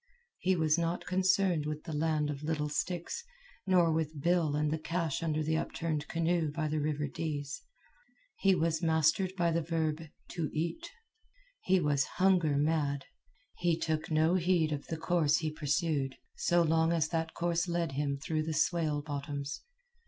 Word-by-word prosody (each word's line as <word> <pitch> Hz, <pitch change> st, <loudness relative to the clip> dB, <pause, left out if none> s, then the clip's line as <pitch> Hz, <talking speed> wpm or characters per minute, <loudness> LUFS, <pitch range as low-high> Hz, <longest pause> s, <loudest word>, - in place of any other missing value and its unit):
He 185 Hz, 0 st, +2 dB
was 160 Hz, -1 st, +2 dB
not 170 Hz, +1 st, -1 dB
concerned 185 Hz, -3 st, +2 dB
with 150 Hz, 0 st, -4 dB
the 160 Hz, -, -6 dB
land 150 Hz, -1 st, +1 dB
of 140 Hz, -1 st, -6 dB
little 150 Hz, -1 st, -1 dB
sticks, 175 Hz, -, -3 dB, 0.4 s
nor 175 Hz, -3 st, +4 dB
with 155 Hz, -1 st, -2 dB
Bill 170 Hz, -1 st, +2 dB
and 150 Hz, 0 st, +1 dB
the 160 Hz, -, -1 dB
cache 165 Hz, -2 st, -2 dB
under 155 Hz, -2 st, 0 dB
the 160 Hz, +1 st, +1 dB
upturned 155 Hz, -2 st, -2 dB
canoe 165 Hz, -1 st, +1 dB
by 155 Hz, 0 st, -2 dB
the 155 Hz, +1 st, 0 dB
river 150 Hz, 0 st, -1 dB
Dease. 145 Hz, -1 st, -4 dB, 0.8 s
He 195 Hz, -1 st, +4 dB
was 165 Hz, -1 st, 0 dB
mastered 160 Hz, +3 st, +2 dB
by 170 Hz, -2 st, +2 dB
the 165 Hz, +1 st, +1 dB
verb 160 Hz, -1 st, -1 dB, 0.3 s
"to 165 Hz, -4 st, -2 dB
eat." 170 Hz, -, -3 dB, 0.7 s
He 190 Hz, 0 st, +3 dB
was 145 Hz, -4 st, +2 dB
hunger 180 Hz, -6 st, +3 dB
mad. 145 Hz, -2 st, 0 dB, 0.5 s
He 175 Hz, -2 st, +2 dB
took 155 Hz, -2 st, -2 dB
no 160 Hz, +2 st, +3 dB
heed 175 Hz, -3 st, +2 dB
of 145 Hz, -1 st, -4 dB
the 160 Hz, -, -3 dB
course 160 Hz, -2 st, +2 dB
he 160 Hz, -2 st, -2 dB
pursued, 145 Hz, -2 st, 0 dB, 0.2 s
so 175 Hz, 0 st, +3 dB
long 160 Hz, 0 st, +3 dB
as 160 Hz, -3 st, +1 dB
that 165 Hz, -1 st, -2 dB
course 170 Hz, 0 st, 0 dB
led 170 Hz, -3 st, -1 dB
him 140 Hz, 0 st, -1 dB
through 155 Hz, +2 st, -2 dB
the 155 Hz, 0 st, -3 dB
swale 155 Hz, -3 st, +1 dB
bottoms. 145 Hz, -1 st, -4 dB
160 Hz, 165 wpm, -31 LUFS, 150-170 Hz, 0.8 s, nor